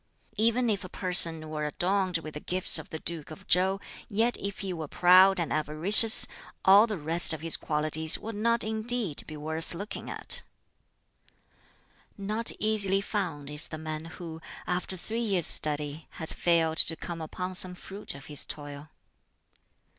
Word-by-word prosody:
"Even 230 +3 +2
if 205 -4 -1
a 185 - -9
person 165 -4 +4
were 155 -1 -4
adorned 185 +3 0
with 155 -2 -9
the 150 - -6
gifts 185 +4 +1
of - - -11
the 160 - -5
Duke 160 -1 -4
of 155 - -12
Chow, 190 +2 +2 0.3
yet 225 +4 +1
if 200 0 -5
he 190 -2 -4
were 160 -3 -6
proud 185 +4 +5
and 170 - -2
avaricious, 165 +9 +5 0.4
all 200 +4 +7
the 215 -3 -4
rest 165 +2 +1
of 160 - -6
his 165 0 +1
qualities 155 +1 +1
would 225 +1 -7
not 230 +2 +1
indeed 220 -5 -1
be 155 - -8
worth 160 +3 -4
looking 200 +5 -7
at. - - 0 1.8
"Not 215 +3 -1
easily 200 -3 +1
found 180 -9 -4
is 150 +1 +1
the 155 - -7
man 155 0 -6
who, 165 -1 -9 0.2
after 180 +1 -3
three 225 +6 -4
years' 195 -8 +1
study, 150 0 0
has 160 - -4
failed 165 -2 +1
to 165 - +7
come 170 0 -7
upon 180 +4 -5
some 185 0 -4
fruit 195 -3 -6
of 135 -1 -12
his 145 -2 0
toil. 145 0 -7
175 Hz, 165 wpm, -28 LUFS, 155-200 Hz, 1.8 s, all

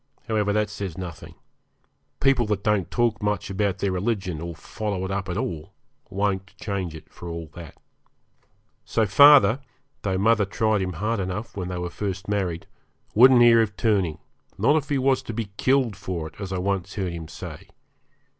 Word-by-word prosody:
However, 105 -2 +1
that 105 0 0
says 95 -5 -5
nothing. 90 -4 -8 0.8
People 130 -4 +3
that 105 -2 -1
don't 105 -4 +1
talk 120 -3 0
much 105 -2 -1
about 100 -1 0
their 100 0 -1
religion, 95 -4 -2
or 85 0 -5
follow 100 +2 -4
it 95 - -4
up 95 -1 -3
at 90 - -2
all, 85 -2 -4 0.4
won't 95 -1 -2
change 95 -6 -4
it 80 - -11
for 85 - -8
all 85 -2 -6
that. 85 -4 -11 1.1
So 110 - +1
father, 140 +3 +7 0.4
though 95 -2 -1
mother 105 +1 +3
tried 110 +1 +1
him 90 -1 -2
hard 105 +7 -1
enough 95 +4 -4
when 95 -3 -4
they 90 0 -4
were 90 0 -4
first 95 -1 -4
married, 95 -5 -2 0.5
wouldn't 125 +2 +7
hear 115 -1 +7
of 105 -2 -2
turning, 95 -9 +1 0.4
not 120 +10 +3
if 150 -2 -1
he 145 - +1
was 135 0 +2
to 115 - -7
be 110 -3 -4
killed 130 -5 +2
for 95 -5 -4
it, - - -27
as 95 -1 -5
I 95 - -1
once 95 +1 -2
heard 95 -4 -2
him 80 -2 -7
say. - - -9
100 Hz, 185 wpm, -24 LUFS, 90-110 Hz, 1.1 s, father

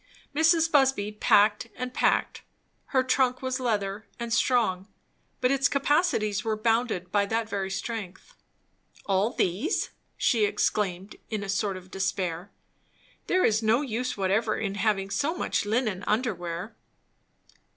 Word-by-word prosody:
Mrs. 325 +1 +4
Busby 265 -8 +3
packed 210 0 +3
and 250 0 -5
packed. - - +1 0.4
Her 260 -2 +1
trunk 255 0 +1
was 260 0 -1
leather, 210 -4 -2
and 235 -1 -3
strong, 220 -6 +1 0.5
but 250 +1 +3
its 275 0 +3
capacities 275 - +1
were 220 -1 -1
bounded 225 -5 0
by 200 -1 +2
that 225 +1 -1
very 195 -2 -3
strength. 200 - -6 0.7
"All 195 +3 +2
these!" 210 - -1 0.3
she 230 -4 +2
exclaimed 195 -2 -1
in 215 -2 -3
a 200 - -6
sort 195 -1 -1
of 185 0 -13
despair. 185 -1 -2 0.8
"There 370 - +3
is 215 0 +2
no 225 +4 +3
use 250 -2 -3
whatever 200 +3 +1
in 200 -3 -2
having 200 -1 0
so 305 - 0
much 205 - -1
linen 215 -4 0
under 220 +1 +1
wear." 175 +4 -6
215 Hz, 140 wpm, -27 LUFS, 195-250 Hz, 0.8 s, Mrs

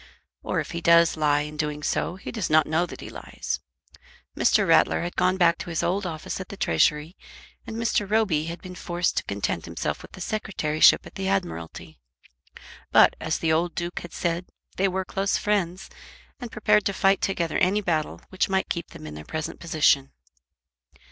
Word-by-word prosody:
Or, - - -1
if - - -4
he 170 - -4
does 170 0 +5
lie 150 -2 +2
in 150 +1 -6
doing 150 -1 -3
so, 175 - -1
he 190 - -8
does 220 -6 -3
not 155 -1 +5
know 160 +3 +1
that - - -10
he - - -8
lies. - - -5 0.8
Mr. - - +3
Rattler - - +4
had 175 +1 -4
gone 185 +1 +2
back 170 -2 +3
to - - -6
his 165 - -1
old 185 +2 0
office 160 +2 -5
at 185 - -9
the 200 - -8
Treasury 150 - +1 0.5
and 220 - -6
Mr. 220 -3 0
Roby 200 -8 +2
had 170 +1 -7
been 185 - -8
forced 175 0 -2
to - - +1
content - - -2
himself - - -3
with - - -13
the - - -10
Secretaryship 170 -8 +2
at - - -12
the 190 0 -4
Admiralty. 175 - -3 0.9
But, - - +6
as 160 0 -1
the 160 -1 +1
old 170 +2 0
Duke 175 0 -3
had 175 - -10
said, 175 +1 -2 0.3
they 195 - +2
were 190 0 -2
close 195 +1 0
friends, 195 -3 -1 0.5
and 245 -4 -7
prepared 210 -1 +3
to 200 - 0
fight 195 0 +3
together 170 -4 0
any 195 +4 +2
battle 160 -5 -1
which 190 +1 0
might 190 0 0
keep 170 -1 -3
them - - -12
in 75 - -7
their 75 0 -8
present 155 - -5
position. 150 -4 +2
175 Hz, 195 wpm, -25 LUFS, 155-195 Hz, 0.9 s, But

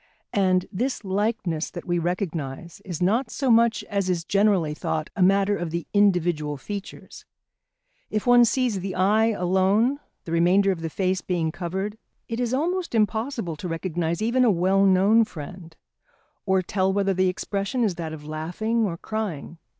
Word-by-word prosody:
And 185 -2 +2
this 240 +2 -2
likeness 190 -5 -1
that - - -8
we 175 -1 0
recognise 170 -4 -4
is 180 -2 -4
not 225 +7 +1
so 260 +2 0
much 230 -1 +4
as 200 -2 -2
is 175 -2 0
generally 195 -5 +2
thought 155 0 -3
a 200 - -2
matter 195 +2 +4
of 175 -4 -3
the 170 0 -3
individual 175 -7 +2
features. 200 +7 -8 0.9
If 215 -1 -2
one 245 -1 +7
sees 240 -3 0
the 190 0 -4
eye 210 +4 +3
alone, 200 +6 +2 0.2
the 165 - -8
remainder 180 +4 +3
of 175 -3 -4
the 165 - -3
face 185 +2 -1
being 170 -3 -1
covered, 190 +5 -4 0.3
it 230 0 -4
is 245 -2 -1
almost 340 +3 -1
impossible 220 - 0
to 180 - -5
recognise 170 +2 -2
even 245 +3 +2
a 245 - +5
well 195 +1 +3
known 195 +5 +5
friend, 165 -2 -9 0.7
or 190 -1 +2
tell 190 +1 0
whether 195 0 +1
the 185 0 +2
expression 200 +6 -2
is 205 -5 +1
that 165 -2 -5
of 150 -1 -9
laughing 175 +10 -2
or 170 -4 -3
crying. 180 -7 -5
190 Hz, 165 wpm, -24 LUFS, 170-215 Hz, 0.9 s, one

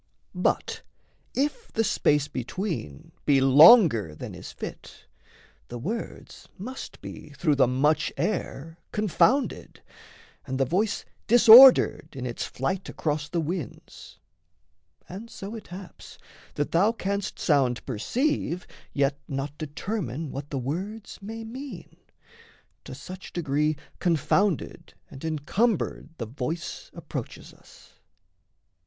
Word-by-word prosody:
But - - -1 0.5
if 295 - -2
the 225 - +1
space 150 -7 +2
between 130 - -5
Be 140 -2 +4
longer 135 - +7
than - - -8
is - - -9
fit, - - -9 0.6
the 120 - -7
words 210 - -6
must 255 +8 -8
be - - -9
Through 150 +1 +2
the 135 -3 +4
much 150 +5 +1
air 165 -2 -3
confounded, 215 - +1 0.6
and 130 0 -3
the 135 - +3
voice 190 - -1 0.2
Disordered 240 - +8
in 130 -2 -5
its 120 -2 -4
flight 155 +10 -3
across 150 -1 -2
the 170 - -1
winds 165 - -7 0.9
And 205 +6 -9
so 200 -1 -8
it 225 - -9
haps, 185 +1 -11 0.4
that 145 - -2
thou 195 +6 +4
canst 200 -2 -3
sound 135 -6 +1
perceive, 180 - -1 0.3
Yet 140 0 +1
not 135 +1 -4
determine 155 - -4
what 140 +1 -6
the 140 - -3
words 185 - -5
may 225 +3 -7
mean; 245 -3 -9 0.9
To - - -8
such 185 +7 -10
degree 150 -2 0 0.2
confounded 175 +2 0 0.2
and 135 - -11
encumbered 160 +7 -1
The 115 - -4
voice 140 +8 -5
approaches - - -7
us. - - -20
165 Hz, 115 wpm, -26 LUFS, 140-210 Hz, 0.9 s, Disordered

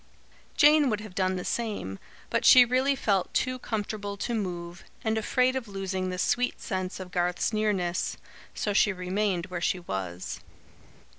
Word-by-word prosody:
Jane 295 -1 +6
would 215 -2 0
have 215 -3 -10
done 185 0 0
the 180 - -4
same, 205 - -3 0.3
but - - +1
she 250 -1 +9
really 260 +3 +2
felt 200 -7 0
too 255 0 0
comfortable 205 -3 -4
to 235 - -3
move, 175 -4 -4 0.2
and 220 0 +1
afraid 250 +4 +2
of 260 -3 -3
losing 190 -2 -3
the 180 - -4
sweet 250 +6 0
sense 185 -1 -3
of 185 -1 -8
Garth's 180 +4 0
nearness. 200 -5 0 0.4
So 205 - -1
she 205 +1 +4
remained 185 -1 -1
where 180 -2 -5
she 185 - +1
was. 95 - -5
200 Hz, 160 wpm, -28 LUFS, 180-225 Hz, 0.4 s, she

